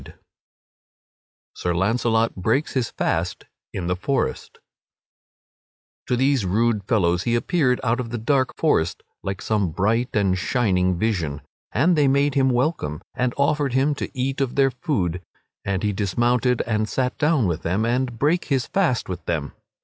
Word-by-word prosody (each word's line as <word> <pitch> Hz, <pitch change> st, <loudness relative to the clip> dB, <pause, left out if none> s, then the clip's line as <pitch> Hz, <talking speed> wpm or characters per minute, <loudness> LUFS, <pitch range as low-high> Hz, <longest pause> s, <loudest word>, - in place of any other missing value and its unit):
[Sidenote: -, -, -14 dB, 1.3 s
Sir 90 Hz, -, -2 dB
Launcelot 115 Hz, +4 st, +1 dB
breaks 110 Hz, +11 st, 0 dB
his 125 Hz, -4 st, 0 dB
fast -, -, -2 dB, 0.3 s
in 90 Hz, -, -4 dB
the 90 Hz, +1 st, 0 dB
forest] 135 Hz, -, -2 dB, 1.5 s
To 125 Hz, -, +1 dB
these 135 Hz, -1 st, +2 dB
rude 105 Hz, +3 st, +1 dB
fellows 90 Hz, -5 st, +2 dB
he 120 Hz, +5 st, 0 dB
appeared 125 Hz, -1 st, +1 dB
out 120 Hz, 0 st, +1 dB
of 120 Hz, -2 st, -4 dB
the 120 Hz, -, -3 dB
dark 130 Hz, +3 st, +1 dB
forest 90 Hz, -, +1 dB, 0.2 s
like 95 Hz, -1 st, -4 dB
some 105 Hz, -5 st, +1 dB
bright 110 Hz, +9 st, 0 dB
and 100 Hz, -3 st, +2 dB
shining 95 Hz, -3 st, +1 dB
vision; 85 Hz, -9 st, -1 dB, 0.3 s
and 170 Hz, +6 st, +3 dB
they 145 Hz, -2 st, +3 dB
made 140 Hz, +1 st, +2 dB
him 135 Hz, -1 st, +3 dB
welcome 120 Hz, -, -1 dB
and 125 Hz, -1 st, -1 dB
offered 140 Hz, -1 st, +1 dB
him 135 Hz, +3 st, +2 dB
to 140 Hz, -, -5 dB
eat 135 Hz, +2 st, -1 dB
of 130 Hz, -2 st, -1 dB
their 135 Hz, -1 st, +3 dB
food, 95 Hz, -, -2 dB, 0.4 s
and 100 Hz, -1 st, -2 dB
he 105 Hz, -1 st, +1 dB
dismounted 120 Hz, +5 st, +1 dB
and 110 Hz, -1 st, -1 dB
sat 125 Hz, -1 st, -1 dB
down 150 Hz, -5 st, +3 dB
with 85 Hz, -2 st, -2 dB
them 95 Hz, +6 st, 0 dB
and 125 Hz, 0 st, -1 dB
brake 155 Hz, +8 st, +1 dB
his 135 Hz, -4 st, 0 dB
fast 170 Hz, -12 st, 0 dB
with 90 Hz, -, -5 dB
them. 75 Hz, -4 st, -2 dB
120 Hz, 160 wpm, -23 LUFS, 95-135 Hz, 1.5 s, and